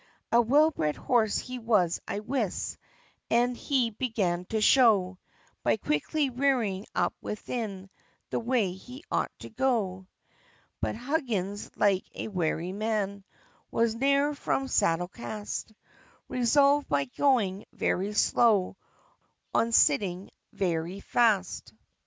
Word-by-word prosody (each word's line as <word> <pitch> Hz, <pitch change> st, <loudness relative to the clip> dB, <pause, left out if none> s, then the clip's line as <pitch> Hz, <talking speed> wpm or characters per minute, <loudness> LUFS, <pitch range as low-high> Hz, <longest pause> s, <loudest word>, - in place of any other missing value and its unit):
A 235 Hz, -, +6 dB
well 290 Hz, +7 st, +4 dB
bred 155 Hz, -, -1 dB
horse 225 Hz, -4 st, +1 dB
he 255 Hz, 0 st, -5 dB
was, 210 Hz, -7 st, +1 dB
I 205 Hz, -, -3 dB
wis, 230 Hz, -4 st, -2 dB, 0.5 s
As 245 Hz, +2 st, +2 dB
he 250 Hz, -3 st, 0 dB
began 205 Hz, -7 st, -1 dB
to 220 Hz, +4 st, -2 dB
show, 210 Hz, -6 st, +4 dB, 0.4 s
By -, -, +2 dB
quickly 260 Hz, -, -1 dB
"rearing 240 Hz, -7 st, 0 dB
up -, -, +1 dB
within 210 Hz, -3 st, -5 dB, 0.4 s
The -, -, 0 dB
way 230 Hz, -5 st, +1 dB
he 250 Hz, +9 st, -11 dB
ought -, -, 0 dB
to -, -, -9 dB
go." 220 Hz, -7 st, -1 dB, 0.7 s
But -, -, -2 dB
Huggins, 230 Hz, -, -2 dB
like 195 Hz, -2 st, +2 dB
a -, -, -5 dB
wary 175 Hz, -2 st, -1 dB
man, 200 Hz, -1 st, -2 dB, 0.5 s
Was 230 Hz, -1 st, +1 dB
ne'er 280 Hz, +4 st, +2 dB
from 270 Hz, -1 st, -1 dB
saddle 175 Hz, -7 st, +1 dB
cast; 210 Hz, +2 st, -6 dB, 0.6 s
Resolved, 280 Hz, +4 st, +3 dB
by 140 Hz, -1 st, +1 dB
going 205 Hz, -, +1 dB
very 200 Hz, +3 st, -1 dB
slow, 210 Hz, -3 st, +3 dB, 0.8 s
On 230 Hz, -, +2 dB
sitting 180 Hz, 0 st, +2 dB, 0.2 s
very 175 Hz, 0 st, -2 dB
fast. 200 Hz, -, +1 dB
215 Hz, 120 wpm, -28 LUFS, 190-250 Hz, 0.8 s, A